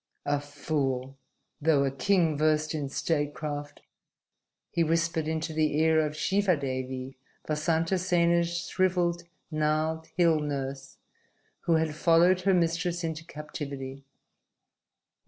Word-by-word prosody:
"A 145 0 +1
fool 140 -3 -2 0.5
though 145 -2 +4
a 135 - 0
king 160 +4 +2
versed 155 +1 +1
in 145 -3 -3
statecraft!" 145 -1 -3 0.9
he 170 - +2
whispered 165 -1 0
into 160 0 -2
the 155 -1 +1
ear 160 0 +4
of 150 -1 -2
Shivadevi, 135 -8 -1 0.3
Vasantasena's 170 +2 +1
shriveled, 175 -2 +1 0.3
gnarled 155 +1 0
hill 165 -3 +4
nurse 135 -2 -4 0.7
who 170 - +3
had 160 -1 +1
followed 170 +4 +4
her 195 +1 +3
mistress 170 0 0
into 160 -1 -3
captivity. 140 -4 -7
155 Hz, 105 wpm, -28 LUFS, 145-170 Hz, 0.9 s, though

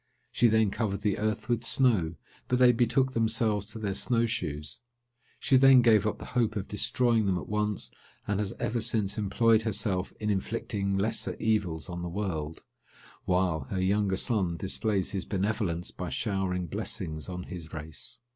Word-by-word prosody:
She 120 - +4
then 110 -2 +3
covered 100 -3 -2
the 105 -3 0
earth 110 -1 -1
with 120 -1 0
snow; 110 -8 +2 0.3
but 125 - +1
they 125 -1 +7
betook 125 +2 +2
themselves 110 -3 +1
to 115 - -6
their 105 -3 -2
snow 115 +3 +1
shoes. 75 -8 -3 0.6
She 130 - +3
then 130 -1 +7
gave 110 -3 +5
up 105 - -2
the - - -9
hope 115 -3 +1
of 100 -2 -3
destroying 115 +1 +1
them 95 -2 +1
at - - -6
once, 105 -1 -1 0.4
and 105 -1 0
has 100 -2 -2
ever 115 0 -1
since 110 -2 0
employed 110 +2 +3
herself 105 -4 0
in 105 -1 0
inflicting 100 -1 -2
lesser 110 +3 0
evils 100 -8 -1
on 85 -1 -5
the 85 - -4
world, 80 -5 -4 0.6
while 90 -6 +1
her 95 +8 -3
younger 95 0 +1
son 95 -9 0
displays 100 +1 -1
his 95 -2 -3
benevolence 95 -3 -2
by - - -5
showering 95 -3 -1
blessings 80 0 -3
on 90 0 -5
his 85 -4 -9
race. 80 +8 -7
105 Hz, 170 wpm, -28 LUFS, 95-115 Hz, 0.6 s, they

